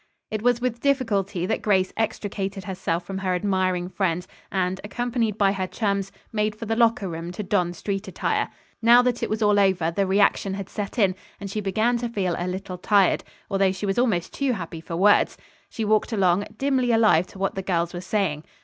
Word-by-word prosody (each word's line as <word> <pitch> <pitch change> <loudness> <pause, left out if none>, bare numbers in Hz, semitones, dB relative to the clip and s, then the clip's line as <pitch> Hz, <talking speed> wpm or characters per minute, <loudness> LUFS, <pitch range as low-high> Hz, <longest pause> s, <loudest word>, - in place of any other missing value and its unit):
It 215 -1 -2
was 245 0 +3
with 245 -1 -2
difficulty 210 -10 0
that 220 - -1
Grace 190 -3 +2
extricated 200 -3 -3
herself 180 -3 -2
from 195 +1 -4
her 185 -1 0
admiring 185 -2 0
friends 180 -2 -1 0.2
and, 190 -1 -1
accompanied 230 -1 -1
by 200 -2 +4
her 190 -1 -2
chums, 200 0 -1 0.2
made 210 -1 0
for 225 - -7
the 225 +1 0
locker 230 -3 +3
room 165 0 -5
to 210 - -4
don 180 -3 +1
street 195 +3 -4
attire. - - -1 0.3
Now 240 +2 +7
that 245 -1 0
it - - -1
was 215 +1 -1
all 205 -1 +4
over 190 -4 +2
the 195 +3 0
reaction 195 0 +2
had 195 -1 -6
set 205 +2 -5
in, 195 -5 +4 0.3
and 200 -1 -6
she 215 - -2
began 220 +5 +1
to 240 0 -2
feel 190 -6 -1
a 175 - -2
little 185 0 -5
tired, 200 -1 +3 0.2
although 195 -2 +2
she 190 +2 -4
was 195 +3 0
almost 215 -9 +1
too 275 -3 0
happy 165 -5 -6
for 165 - -6
words. 205 +4 +4 0.3
She 225 - -3
walked 215 +3 +2
along, 195 -2 +2
dimly 260 -2 +1
alive 215 -7 +4
to - - -14
what 195 0 -1
the 195 - -3
girls 175 -2 -1
were 175 - -5
saying. 185 -6 -1
195 Hz, 205 wpm, -24 LUFS, 185-220 Hz, 0.3 s, Now